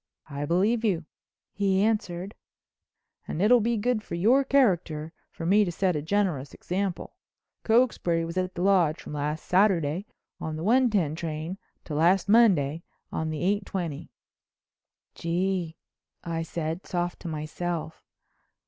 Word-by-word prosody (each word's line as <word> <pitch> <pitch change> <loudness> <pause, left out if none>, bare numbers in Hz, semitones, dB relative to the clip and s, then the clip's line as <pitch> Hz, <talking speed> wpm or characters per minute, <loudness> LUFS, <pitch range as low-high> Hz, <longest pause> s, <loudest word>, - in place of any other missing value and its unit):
"I 140 +1 -3
believe 205 +8 +2
you," 180 -7 0 0.5
he 195 -1 +2
answered, 200 -3 -1 0.9
"and - - -4
it'll 230 +5 +5
be 230 +1 +1
good 235 +1 0
for 170 - -6
your 235 +11 +4
character 175 - +1 0.2
for 165 - -7
me 205 +4 +5
to 180 - -2
set 180 0 0
a 150 - -1
generous 160 -5 -1
example. 190 0 -3 0.5
Cokesbury 220 -8 +2
was 165 +1 -6
at 185 0 -2
the 175 - -2
Lodge 180 -6 +3
from - - -9
last 150 +1 -3
Saturday 180 -2 +2 0.3
on 160 -1 -4
the 160 - -5
one 250 +5 +4
ten 180 -9 +1
train 160 +3 -5 0.2
to 155 - -7
last 175 +6 +3
Monday 180 -9 +4 0.3
on 160 0 -2
the 155 +1 -3
eight 200 +2 +1
twenty." 170 -7 -4 1.0
"Gee!" 175 -1 -2 0.5
I 165 -1 -2
said, 165 +1 -4
soft 175 -1 -2
to - - -8
myself. 160 +1 -4
175 Hz, 145 wpm, -27 LUFS, 160-205 Hz, 1.0 s, it'll